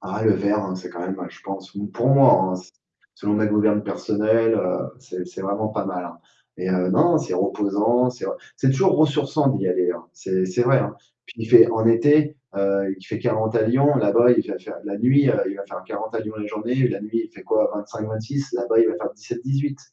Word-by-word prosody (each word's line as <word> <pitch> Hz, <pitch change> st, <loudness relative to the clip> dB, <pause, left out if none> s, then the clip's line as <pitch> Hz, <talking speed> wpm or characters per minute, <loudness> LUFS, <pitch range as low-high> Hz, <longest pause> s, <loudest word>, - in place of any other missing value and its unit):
Ah 100 Hz, +3 st, -5 dB
le 110 Hz, -, +5 dB
vert, 100 Hz, +2 st, 0 dB
hein, 95 Hz, -1 st, -4 dB
c'est 90 Hz, -1 st, -9 dB
quand 85 Hz, -, -9 dB
même, 95 Hz, +2 st, -4 dB
je -, -, -17 dB
pense, 95 Hz, -1 st, -8 dB, 0.2 s
pour 120 Hz, +2 st, 0 dB
moi, 135 Hz, -9 st, +5 dB
hein, 90 Hz, -, -6 dB, 0.5 s
selon 105 Hz, +1 st, -2 dB
ma 110 Hz, 0 st, +2 dB
gouverne 105 Hz, 0 st, +2 dB
personnelle, 110 Hz, +2 st, +1 dB
heu, 90 Hz, -4 st, -1 dB, 0.2 s
c'est 90 Hz, 0 st, -8 dB
c'est 90 Hz, -, -10 dB
vraiment 100 Hz, +3 st, -2 dB
pas 105 Hz, -2 st, -3 dB
mal, 90 Hz, -2 st, -4 dB
hein 85 Hz, -, -10 dB, 0.4 s
et 90 Hz, +1 st, -3 dB
heu, 90 Hz, 0 st, +1 dB
non, 160 Hz, -, +4 dB
c'est 155 Hz, -, -4 dB
reposant, 105 Hz, +6 st, +1 dB
c'est 125 Hz, -, -8 dB
re -, -, -4 dB, 0.2 s
c'est 135 Hz, -, +1 dB
toujours 185 Hz, +8 st, +3 dB
ressourçant 150 Hz, -1 st, +2 dB
d'y 95 Hz, -8 st, -1 dB
aller, 90 Hz, 0 st, +1 dB
hein. 85 Hz, -, -7 dB
C'est 95 Hz, -1 st, -2 dB
c'est 95 Hz, +6 st, 0 dB
vrai, 130 Hz, +2 st, +4 dB
hein. -, -, -3 dB, 0.3 s
Puis -, -, -14 dB
il -, -, -4 dB
fait, -, -, +8 dB
en 110 Hz, 0 st, 0 dB
été, 145 Hz, +6 st, +4 dB, 0.2 s
heu, 100 Hz, 0 st, 0 dB
il 95 Hz, -, -17 dB
fait -, -, -4 dB
40 110 Hz, +1 st, -1 dB
à -, -, +3 dB
Lyon, 140 Hz, +6 st, +3 dB
là-bas, 120 Hz, +1 st, +4 dB
il -, -, +1 dB
va -, -, -4 dB
faire, -, -, -10 dB
la 100 Hz, -, -5 dB
nuit, 135 Hz, +4 st, +4 dB
heu, -, -, +1 dB
il 100 Hz, -, -7 dB
va 100 Hz, -, -7 dB
faire 95 Hz, -, -9 dB
40 110 Hz, +3 st, -6 dB
à -, -, -1 dB
Lyon 110 Hz, 0 st, -7 dB
en -, -, -5 dB
journée, 120 Hz, +5 st, -1 dB
la 100 Hz, -, -4 dB
nuit, 115 Hz, +2 st, -3 dB
fait -, -, -13 dB
quoi 110 Hz, 0 st, +1 dB
25-26, 110 Hz, +6 st, -5 dB
là-bas, 120 Hz, -2 st, 0 dB
il 115 Hz, -, +5 dB
va -, -, -2 dB
faire -, -, -5 dB
17-18. 135 Hz, +6 st, -4 dB
110 Hz, 230 wpm, -22 LUFS, 100-125 Hz, 0.5 s, fait